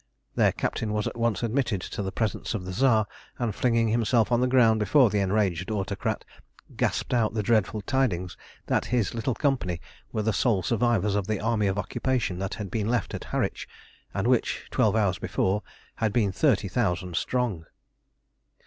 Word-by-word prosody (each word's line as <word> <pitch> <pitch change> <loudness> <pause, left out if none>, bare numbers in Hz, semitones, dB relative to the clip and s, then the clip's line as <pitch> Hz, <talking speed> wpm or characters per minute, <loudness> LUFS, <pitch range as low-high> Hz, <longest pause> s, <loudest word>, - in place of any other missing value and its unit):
Their - - +3
captain 105 -1 -2
was 105 -1 0
at - - -3
once 115 -3 0
admitted 115 -3 0
to 100 - -5
the 95 -1 -3
presence 110 +2 -2
of 95 -4 -4
the 95 - -5
Tsar, 110 -1 +3 0.3
and, 120 -4 -1
flinging 115 0 +2
himself 115 0 +2
on 120 0 +3
the 125 - +3
ground 120 -4 +4
before 120 +2 +4
the 105 - +1
enraged 95 -3 0
Autocrat, 100 -4 -2 0.5
gasped - - -1
out 115 -3 +1
the 105 - 0
dreadful 110 -1 +1
tidings 100 -7 0 0.3
that - - +1
his 120 -7 0
little 115 +1 -1
company 125 - 0 0.3
were 110 - -1
the 110 0 +1
sole 105 -6 +2
survivors 115 0 +1
of 100 -2 -1
the 110 -2 -1
army 110 -1 +1
of 95 +1 -1
occupation 105 -1 -1
that 95 0 -3
had 105 -4 -6
been 110 -3 -1
left 120 -2 0
at - - -5
Harwich, - - -2 0.4
and - - -2
which, - - +1
twelve 110 -1 +2
hours 100 -5 +1
before, 95 +3 0 0.4
had 110 -2 +1
been 105 -3 +2
thirty - - +2
thousand 90 0 -1
strong. 105 -4 -1
110 Hz, 180 wpm, -26 LUFS, 95-120 Hz, 0.5 s, ground